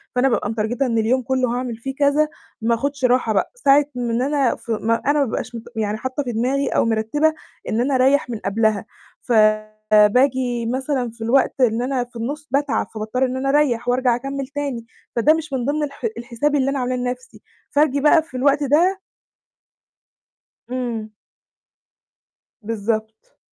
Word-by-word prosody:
فأنا 260 +2 +3
بابقى 205 -3 0
مترجتة 225 +5 -1
إن 230 -2 0
اليوم 235 +4 +2
كله 255 0 0
هاعمل 250 -2 -3
فيه 270 +3 -6
كذا، 290 +2 +3 0.3
ما 230 +1 +2
آخُدش 280 +2 -2
راحة 245 -3 +2
بقى، 195 - 0
ساعة 285 - +4
من 240 -1 -1
أنا 275 -2 +1
ف - - -18
ما 225 +1 +1
أنا 295 +1 +3
ما 280 - +3
بابقاش 235 0 -4
مت 230 - -6
يعني 215 -1 -1
حاطّة 260 +5 -3
في 245 - -4
دماغي 260 +4 0
أو - - +1
مرتّبة 230 +8 +1 0.4
إن 225 +2 +1
أنا 270 +1 +1
أريّح 265 0 +3
من 230 - -3
قبلها، 215 0 +1 0.4
فباجي 215 +3 +2
مثلًا 260 0 -1
في 230 0 -9
الوقت 260 +3 +2
إن 235 -1 +3
أنا 255 0 -1
في 245 0 -18
النُّص 285 +7 -5
باتعب، 280 -4 0
فباضطر 220 +5 -1
إن 255 0 -3
أنا 275 +1 -1
أريح 260 -5 +2
وأرجع 250 -1 +2
أكمّل 275 +2 -4
تاني، 280 -5 -4 0.3
فده 280 +7 +4
مش 315 -3 -4
من 250 -2 -1
ضمن 295 +2 0
الح 285 +8 -5
الحساب 245 +5 -1
اللي 275 -1 +2
أنا 275 -1 -1
عاملاه 250 0 -1
لنفسي 250 0 -5 0.3
فاجي 285 -1 +2
بقى 310 +2 +5
في 285 -5 -9
الوقت 280 +2 +2
ده 345 +8 +3 1.7
إمم. 235 -4 -3 1.5
بالضبط. 220 - -4
250 Hz, 170 wpm, -21 LUFS, 230-280 Hz, 1.7 s, بقى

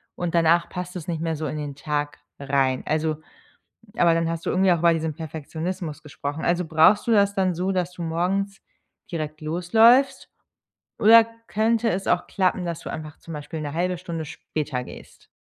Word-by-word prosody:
und 175 -1 -3
danach 170 0 +3
passt 180 0 -6
es 175 -4 -6
nicht 165 -2 -2
mehr 165 -1 -1
so 155 - -4
in 155 - -4
den 145 -2 -5
Tag 145 +1 -3 0.2
rein. 135 -2 +1
Also 155 0 0 0.8
aber 170 -1 +4
dann 165 0 0
hast 165 0 -4
du - - +1
irgendwie 185 +1 +3
auch 170 - +2
über 170 0 +5
diesen 160 -1 -2
Perfektionismus 160 +1 -5
gesprochen, 145 0 -5
also 175 +1 +1
brauchst 160 +6 +4
du 235 - +2
das 200 -1 +4
dann 185 -2 +1
so, 180 +3 -1
dass 180 -2 -1
du 180 - -8
morgens 190 +4 -1 0.5
direkt 155 -2 -4
losläufst 220 - +3 0.7
oder 225 +1 +8 0.2
könnte 225 +2 +1
es 195 -1 -2
auch 180 - +1
klappen, 185 -2 0
dass 170 -1 -3
du - - -8
einfach 155 -1 -7
zum 165 - -10
Beispiel 150 +1 -6
'ne 145 -1 -5
0,5 180 +2 -1
Stunde 170 -2 -5
später 145 -3 -4
gehst? - - -13
165 Hz, 185 wpm, -24 LUFS, 155-185 Hz, 0.8 s, oder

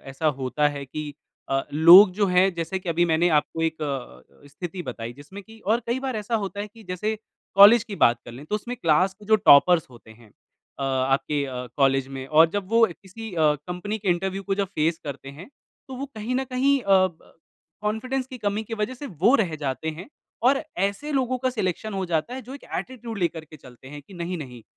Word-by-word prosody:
ऐसा 135 +4 -3
होता 135 +3 +1
है 140 - -5
कि 150 +2 -6 0.4
अ, 135 0 0
लोग 175 +6 +9
जो 200 - +4
हैं 185 +1 +3
जैसे 170 +3 -3
कि 185 - -9
अभी 170 +1 +2
मैंने 170 +1 +2
आपको 165 +2 -7
एक 160 -1 -2
अ 125 - -7
अ, - - -15
स्थिति 175 +4 -7
बताई 115 0 -7
जिसमें 145 +10 -12
कि 225 +2 -16
और 225 +4 +2
कई 240 +2 -1
बार 255 - -2
ऐसा 215 +2 -3
होता 200 +1 -6
है 205 - -4
कि 225 - -14
जैसे 210 +5 -2 0.4
कॉलेज 205 +3 +8
की 200 -3 -7
बात 120 0 +5
कर 120 - -10
लें, 135 +5 -10
तो 210 - -3
उसमें 240 +4 -4
क्लास 185 -2 +2
के 210 +1 -17
जो 215 - +7
टॉपर्स 165 +3 +7
होते 120 -2 -16
हैं 110 0 -17
अ, 135 - -15
आपके 135 +2 0
अ, 125 -1 -6
कॉलेज 135 -1 +2
में 130 0 -6
और 155 +3 +5
जब 195 0 -3
वो 230 0 +5
अ, - - -9
किसी 220 +3 -9
अ, 155 -2 +3
कंपनी 205 +5 -4
के 195 -2 -4
इंटरव्यू 190 +2 -1
को 195 0 -1
जब - - -2
फ़ेस 160 +2 +1
करते 140 -2 -7
हैं, 185 +8 -10 0.4
तो 265 - -7
वो 275 +2 -5
कहीं 220 +4 -3
न 265 +1 0
कहीं 275 +2 +3
अ, 190 -2 +4
ब 170 -3 -14 0.5
कॉन्फिडेंस 250 +5 -2
की 260 -1 -9
कमी 205 0 -1
की 225 +1 -6
वजह 215 +5 -2
से 285 +3 -8
वो 230 +8 +5
रह 180 -7 0
जाते 140 +3 -3
हैं 180 - -10 0.4
और 275 +2 +2 0.2
ऐसे 200 +10 -2
लोगों 255 -2 0
का 255 +1 0
सिलेक्शन 210 -2 -3
हो 190 - -2
जाता 170 +9 -1
है 260 - -6
जो 265 - -7
एक 280 - -11
एटीट्यूड 235 -4 -6
लेकर 170 -3 -2
के 155 0 -14
चलते 130 -1 -15
हैं 145 +1 -9
कि 190 - -16
नहीं, 175 +1 -4
नहीं, 125 -6 -9
180 Hz, 230 wpm, -24 LUFS, 150-215 Hz, 0.5 s, लोग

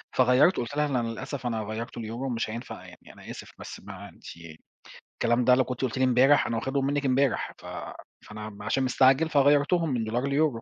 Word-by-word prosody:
فغيّرته 130 +6 +4
قلت 120 +5 -6
لها 150 - +2
إن 140 -3 -2
أنا 120 -2 0
للأسف 125 +3 -6
أنا 115 -2 -2
غيّرته 115 +3 -6
ليورو، 120 +5 -4
مش 115 -2 -2
هينفع 115 +3 -7
يعني، - - -15
أنا - - -14
آسف، - - -10
بس - - -9
ما - - -10
أنتِ - - -21 0.9
الكلام 120 +1 +1
ده 125 - +6
لو 130 - +3
كنتِ 125 0 -6
قلتِ 130 -1 -2
لي 130 - +1
امبارح 130 +3 +4
أنا 115 - -2
واخدهم 135 +3 -1
منِك 140 +1 -1
امبارح، 135 0 +1
ف - - -15 0.6
فأنا 105 0 -7
م 105 -1 -12
عشان 130 +5 0
مستعجل 135 +4 +3
فغيّرتهم 145 +4 +3
من 120 -4 -1
دولار 120 +5 -2
ليورو. 140 -4 +1
130 Hz, 210 wpm, -27 LUFS, 115-140 Hz, 0.9 s, ده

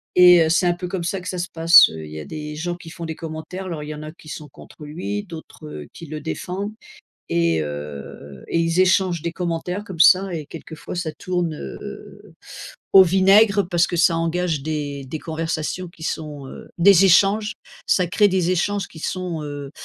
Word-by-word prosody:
et 180 -1 +8
heu 160 - 0
c'est 170 +2 +2
un 175 - +3
peu 180 +1 -6
comme 180 -1 -4
ça 185 +3 -2
que 180 - -6
ça 185 - -4
se 175 +1 -3
passe, 165 +1 +8
il 80 -1 -8
y 80 - -7
a 75 - -7
des 150 -1 -7
gens 175 +3 -3
qui 175 -1 -12
font 170 0 -7
des 160 - -4
commentaires 165 +4 -7
alors 160 -4 -5
il 150 - -8
y 155 - -5
en 150 - -9
a 155 - -7
qui 160 - -18
sont 150 -1 -7
contre 150 - -14
lui, 180 +7 -4
d'autres 160 - -10
qui 165 - -10
le 155 +1 -6
défendent 185 +6 -4 0.6
et 85 -1 +1
heu 75 -2 -8
et 165 - +1
ils 165 +2 +1
échangent 185 -3 +2
des 170 - -2
commentaires 180 +2 -3
comme 185 -5 -9
ça 185 +2 +6
et 155 -3 -4
quelquefois 160 +1 -9
ça 175 -3 -3
tourne, 175 -3 -2
heu, 65 - -10 0.6
au 195 - +11
vinaigre 195 +2 +4
parce 175 -1 +2
que - - -3
ça 170 0 +4
engage 165 -2 -1
des 145 -3 -4
des 155 +4 -5
conversations 165 +2 -3
qui 165 -1 -13
sont, 150 -3 -5
heu, - - -11
des 190 +1 +6
échanges, 205 +4 +4 0.3
ça 180 - +3
crée 205 +4 +3
des 185 -2 +1
échanges 195 +2 0
qui 160 - -13
sont, 180 -2 -3
heu 145 -1 -7
170 Hz, 205 wpm, -22 LUFS, 155-185 Hz, 0.6 s, au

